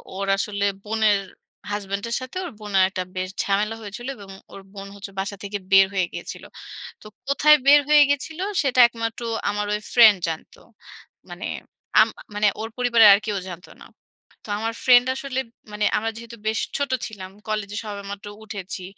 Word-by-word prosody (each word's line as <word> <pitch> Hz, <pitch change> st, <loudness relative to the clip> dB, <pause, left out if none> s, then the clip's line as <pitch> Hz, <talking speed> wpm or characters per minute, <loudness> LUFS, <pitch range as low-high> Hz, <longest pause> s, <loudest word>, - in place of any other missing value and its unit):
ওর 195 Hz, +1 st, -3 dB
আসলে 200 Hz, 0 st, -1 dB, 0.2 s
বোনের 215 Hz, -1 st, +2 dB, 0.5 s
হাসব্যান্ডের 205 Hz, +3 st, -3 dB
সাথে 255 Hz, +7 st, -7 dB
ওর 345 Hz, -, -6 dB
বোনের 205 Hz, -3 st, +2 dB
একটা 185 Hz, -1 st, -3 dB
বেশ 185 Hz, 0 st, -3 dB
ঝামেলা 210 Hz, +2 st, 0 dB
হয়েছিল 215 Hz, +4 st, -8 dB
এবং 200 Hz, -4 st, -13 dB, 0.2 s
ওর 195 Hz, -, -10 dB
বোন 200 Hz, -1 st, -8 dB
হচ্ছে 200 Hz, 0 st, -9 dB
বাসা 195 Hz, +1 st, -3 dB
থেকে 205 Hz, 0 st, -4 dB
বের 195 Hz, 0 st, +8 dB
হয়ে 190 Hz, -2 st, +1 dB
গিয়েছিল। -, -, -7 dB, 0.6 s
তো -, -, -17 dB, 0.2 s
কোথায় 300 Hz, +2 st, +5 dB
বের 290 Hz, +1 st, +8 dB
হয়ে 300 Hz, -1 st, +8 dB
গেছিল 285 Hz, +3 st, -2 dB, 0.2 s
সেটা 265 Hz, -4 st, 0 dB
একমাত্র 230 Hz, -1 st, -5 dB, 0.3 s
আমার 205 Hz, 0 st, -2 dB
ঐ -, -, +2 dB, 0.2 s
ফ্রেন্ড 220 Hz, -4 st, +8 dB
জানত। 160 Hz, -1 st, -6 dB, 0.7 s
মানে -, -, -7 dB, 0.6 s
আম -, -, +4 dB
আ -, -, -11 dB
মানে 210 Hz, 0 st, +3 dB
ওর 225 Hz, -, -4 dB
পরিবারের 235 Hz, -3 st, +5 dB
আর 200 Hz, -, +4 dB
কেউ 210 Hz, -2 st, -2 dB
জানত 175 Hz, -1 st, -9 dB
না। -, -, -11 dB, 0.6 s
তো -, -, -12 dB
আমার 225 Hz, +1 st, -2 dB
ফ্রেন্ড 245 Hz, -1 st, +6 dB
আসলে 270 Hz, -1 st, -3 dB, 0.3 s
মানে 210 Hz, 0 st, -1 dB
আমরা 225 Hz, +1 st, -2 dB
যেহেতু 235 Hz, 0 st, -10 dB
বেশ 220 Hz, +1 st, +1 dB, 0.2 s
ছোট 285 Hz, -2 st, -2 dB, 0.2 s
ছিলাম। 190 Hz, -4 st, -10 dB, 0.2 s
কলেজে 210 Hz, -1 st, -3 dB
সবে 205 Hz, -1 st, -6 dB
মাত্র 200 Hz, +1 st, -8 dB, 0.2 s
উঠেছি। 200 Hz, -3 st, -7 dB
210 Hz, 175 wpm, -23 LUFS, 200-235 Hz, 0.7 s, বের